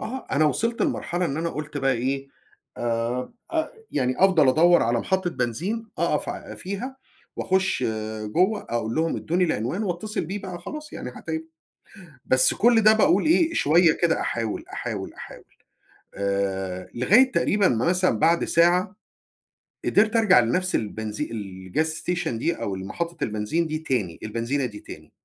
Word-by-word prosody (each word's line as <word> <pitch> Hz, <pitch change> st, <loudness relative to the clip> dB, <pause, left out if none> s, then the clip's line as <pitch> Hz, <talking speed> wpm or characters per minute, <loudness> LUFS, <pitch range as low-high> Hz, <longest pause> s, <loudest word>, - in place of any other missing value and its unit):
آه، 260 Hz, +3 st, -6 dB
أنا 145 Hz, +4 st, +3 dB
وصلت 230 Hz, +10 st, 0 dB
لمرحلة 175 Hz, +1 st, -1 dB
إن 140 Hz, -4 st, -2 dB
أنا 165 Hz, +1 st, -1 dB
قُلت 150 Hz, -1 st, -6 dB
بقى 135 Hz, -1 st, +2 dB
إيه، 135 Hz, +3 st, -2 dB, 0.5 s
آآ 120 Hz, -, -2 dB, 0.2 s
أ 315 Hz, -1 st, +1 dB, 0.2 s
يعني 130 Hz, -1 st, 0 dB
أفضل 180 Hz, -8 st, +5 dB
أدَوّر 170 Hz, +5 st, +5 dB
على 120 Hz, +1 st, +1 dB
محطة 190 Hz, +3 st, 0 dB
بنزين 170 Hz, -, -2 dB
أقف -, -, 0 dB
ع -, -, -6 dB
فيها 200 Hz, +8 st, -5 dB, 0.4 s
وأخُش 190 Hz, -6 st, 0 dB, 0.4 s
جوّه 185 Hz, -, +1 dB
أقول 115 Hz, -1 st, -2 dB
لهم 165 Hz, +1 st, 0 dB
ادّوني 180 Hz, +3 st, 0 dB
العنوان 160 Hz, -, -1 dB
واتّصل 210 Hz, +2 st, -3 dB
بيه 190 Hz, +6 st, -4 dB
بقى 185 Hz, -2 st, -6 dB
وخلاص، 300 Hz, -, -8 dB
يعني -, -, -6 dB
حتى 160 Hz, -, -7 dB
ي 160 Hz, 0 st, -4 dB, 0.8 s
بس 130 Hz, 0 st, +5 dB
كل 230 Hz, -1 st, +4 dB
ده 215 Hz, +1 st, +7 dB
باقول 210 Hz, -2 st, +3 dB
إيه، 330 Hz, +1 st, +3 dB
شوية 165 Hz, -, +4 dB
كده 165 Hz, -1 st, +2 dB
أحاول، 115 Hz, -2 st, -3 dB
أحاول، -, -, -4 dB
أحاول -, -, -11 dB, 0.7 s
آآ، 95 Hz, -2 st, -2 dB
لغاية 220 Hz, -, +4 dB
تقريبًا 200 Hz, -4 st, +2 dB
مثلًا 170 Hz, +3 st, +1 dB
بعد 170 Hz, +8 st, +3 dB
ساعة 180 Hz, +4 st, +2 dB, 0.9 s
قدرت 220 Hz, +2 st, +3 dB
أرجع 215 Hz, -, +6 dB
لنفْس 180 Hz, +11 st, +1 dB
البنزي 110 Hz, +4 st, -3 dB
الgas 100 Hz, -, -3 dB, 0.2 s
station 180 Hz, 0 st, -1 dB
دي 120 Hz, +9 st, -1 dB
أو 100 Hz, -, -2 dB
محطة 165 Hz, -, -4 dB
البنزين 110 Hz, +11 st, -1 dB
دي 155 Hz, 0 st, -2 dB
تاني، 120 Hz, -, -2 dB
البنزينة 115 Hz, +5 st, -2 dB
دي 105 Hz, -4 st, -7 dB
تاني، -, -, -12 dB
160 Hz, 150 wpm, -24 LUFS, 115-190 Hz, 0.9 s, ده